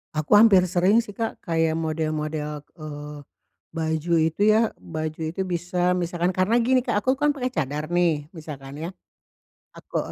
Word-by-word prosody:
Aku 155 +6 +3
hampir 205 -3 +8
sering 185 +5 +3
sih, 205 -4 -5
Kak. 225 -1 -3
Kayak 165 -2 0
model-model, 155 -1 -2 0.2
eee, 150 -1 -8 0.5
baju 160 +1 -1
itu 160 +4 0
ya, 215 +1 +3
baju 155 0 -5
itu 190 - -4
bisa 180 +1 0
misalkan 175 0 -1
karena 205 +6 +3
gini, 255 +1 +3
Kak, 205 - +1
aku 260 +6 +1
kan 295 +2 +2
pakai 260 -3 -2
cadar 150 - -3
nih, 170 -4 +1
misalkan 140 -4 -8
ya. 160 +3 -5 0.9
Aku - - -5
170 Hz, 155 wpm, -24 LUFS, 155-200 Hz, 0.9 s, hampir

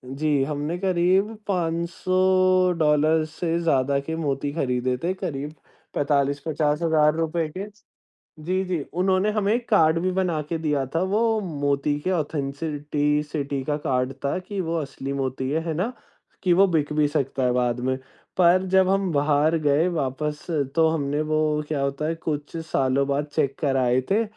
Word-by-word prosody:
जी, 150 -2 +1
हमने 150 +4 -3
करीब 190 +3 +1
$500 175 -3 +2
से 165 +2 -2
ज़्यादा 140 -4 +2
के 160 +4 -4
मोती 145 -2 -2
खरीदे 125 -4 0
थे 180 - +1
करीब 150 -5 -5 0.4
45-50 145 +2 0
हज़ार 155 -2 +3
रुपये 165 0 -1
के। 195 - -3 0.8
जी, 185 +2 0
जी, 180 -4 -2
उन्होंने 185 +3 +2
हमें 210 0 +1
एक 240 0 -2
कार्ड 165 -6 +4
भी 185 +2 0
बना 180 -4 0
के 165 - -1
दिया 150 -4 0
था, 165 - +2
वो 220 +3 +1
मोती 145 -4 -1
के 185 +5 -2
ऑथेंसिटी 150 -1 -1
सिटी 140 -2 -3
का 145 +2 -1
कार्ड 125 0 0
था 140 - 0
कि 190 +2 -6
वो 165 -1 -2
असली 135 0 -5
मोती 130 -1 -2
है, 155 +3 +1
है 160 - -1
ना? 195 +11 -2 0.5
कि 180 - +4
वो 195 +3 +6
बिक 160 -5 0
भी 150 -1 +3
सकता 140 -3 -1
है 125 - +3
बाद 125 -1 0
में। 130 +1 0 0.4
पर 180 +1 +5
जब 190 -1 +5
हम 195 -1 +1
बाहर 150 +2 +2
गए 150 +3 +2
वापस 150 -1 -3 0.3
तो 160 -1 +5
हमने 145 -2 -1
वो 155 - +2 0.3
क्या 145 -3 -2
होता 140 +2 -2
है 165 - -1
कुछ 150 +1 -3
सालों 135 -2 +1
बाद 140 +1 0
चेक 140 -3 0
कराए 130 -3 +2
थे, 215 +3 +3
155 Hz, 165 wpm, -24 LUFS, 140-175 Hz, 0.8 s, वो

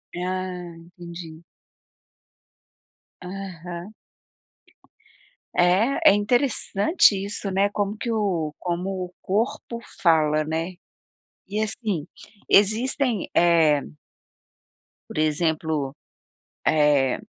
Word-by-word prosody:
Ah, 180 -1 -4
entendi. 170 -1 -11 1.8
Aham. 180 0 -7 1.6
É, 190 +9 +4
é - - +4
interessante 215 - +3
isso 200 0 -4
né, 195 +2 +2
como 205 +1 -2
que 235 0 -3
o 180 -9 -1
como 180 +2 -2 0.2
o 180 - -14
corpo 230 +3 -2 0.2
fala, 155 -3 +3
né? 165 +4 -3 0.7
E 210 +2 -2
assim, 210 - -1 0.4
existem, 225 +2 +3
eh 165 -4 +4 1.3
por - - -8
exemplo, 155 -2 0 0.7
eh, 145 -4 +3
180 Hz, 80 wpm, -24 LUFS, 160-205 Hz, 1.8 s, É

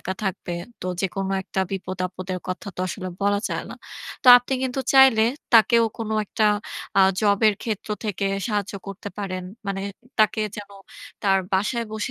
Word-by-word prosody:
একা 190 - -4
থাকবে 185 -2 -3 0.3
তো - - -5
যেকোনো 195 0 -2
একটা 190 - -3
বিপদ-আপদের 185 -1 -4
কথা 185 +3 -4
তো - - -4
আসলে 185 +1 -5
বলা 205 0 +2
যায় - - -3
না। - - -7 0.5
তো - - -7
আপনি 245 +2 -6
কিন্তু 260 +1 -1
চাইলে 265 -5 +7 0.3
তাকেও 230 +1 +6
কোন 225 - -4 0.2
একটা 215 - -1 0.5
আ - - +8 0.2
জব 205 -2 +3
এর 210 - +2
ক্ষেত্র 220 -3 -4 0.2
থেকে 200 -1 -2 0.2
সাহায্য 205 -3 -2
করতে 195 +1 -7
পারেন। 185 -2 -3 0.2
মানে 195 0 -2 0.4
তাকে 215 +1 +3 0.2
যেন 205 -1 -8 0.5
তার 195 -2 +4
বাসায় 210 +5 +1
বসে 215 -1 -3
200 Hz, 165 wpm, -23 LUFS, 190-220 Hz, 0.5 s, আ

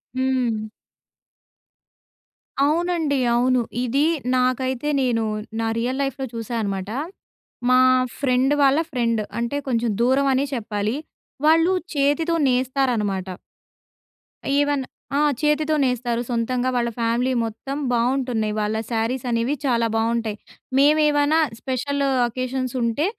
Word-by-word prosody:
హ్మ్. 250 -4 0 2.0
అవునండి. 320 -2 +1 0.2
అవును. 250 +1 +3 0.2
ఇది 275 +5 +2 0.3
నాకైతే 255 +2 0
నేను 235 -3 +1 0.4
నా 225 - 0
రియల్ 255 +4 -1
లైఫ్‌లో 270 0 -3
చూశా 230 +1 -4
అనమాట. 195 -1 -3 0.8
మా 255 0 +6 0.4
ఫ్రెండ్ 260 0 +2
వాళ్ళ 275 +2 +4
ఫ్రెండ్ 230 -3 0 0.2
అంటే, 235 +4 -2
కొంచెం 235 -2 0
దూరం 265 +3 +3
అనే 265 +2 +1
చెప్పాలి. 210 0 -2 0.5
వాళ్ళు 330 +4 +5 0.2
చేతితో 290 +4 +2
నేస్తారనమాట. 250 -7 0 1.3
ఈవెన్ 290 -1 +1 0.3
ఆ! - - +3 0.2
చేతితో 305 +1 +2
నేస్తారు 240 -2 0
సొంతంగా. 245 +2 0
వాళ్ళ 240 -1 +1
ఫ్యామిలీ 235 +3 +1
మొత్తం 245 +5 -5
బావుంటున్నాయి. 240 -3 0
వాళ్ళ 210 +1 -1
శారీస్ 235 +3 -1
అనేవి 235 +3 0
చాలా 235 -3 +2
బాగుంటాయి. 225 -1 0 0.4
మేము 295 +3 +5
ఏమైనా 290 +2 +2 0.2
స్పెషల్ 275 +3 -2 0.3
అకేషన్స్ 255 +1 -3
ఉంటే, 235 +7 0
255 Hz, 110 wpm, -22 LUFS, 230-275 Hz, 2.0 s, మా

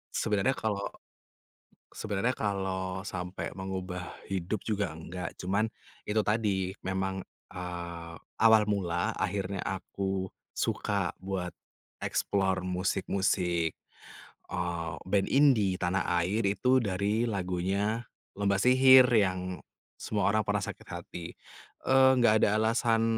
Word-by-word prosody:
Sebenarnya 105 +5 +1
kalau 100 -2 -2 1.1
sebenarnya 110 +4 -1
kalau 95 -1 -2
sampai 90 0 -5
mengubah 95 -1 -4 0.2
hidup 95 +1 -2
juga 100 -5 0
enggak, 85 +3 -7
cuman, 100 +5 0 0.3
itu 110 +1 +1
tadi 100 -4 0
memang, 95 0 -2 0.3
eee, 85 -2 -6 0.3
awal 110 -1 +7
mula, 90 -4 0
akhirnya 95 0 -2
aku 95 -1 -2 0.3
suka 100 -3 -1
buat 95 -2 -3 0.5
explore 95 -1 0
musik-musik, 90 -2 0 0.8
eee, 85 -2 -2
band 95 +1 +1
indie 120 -10 +4
tanah 90 +1 0 0.2
air, 95 +7 0
itu 125 +5 +3
dari 100 +3 0
lagunya 100 +3 -1 0.3
Lomba 100 -1 +1
Sihir, 130 +2 +8
yang 95 -4 +1 0.4
"Semua 105 -3 -1
Orang 110 +1 +3
Pernah 105 0 0
Sakit - - -7
Hati." 85 - -7 0.6
Eee, 130 0 +6
nggak 110 -3 +4
ada 105 +1 +3
alasan 115 0 +2
95 Hz, 110 wpm, -30 LUFS, 90-105 Hz, 1.1 s, Sihir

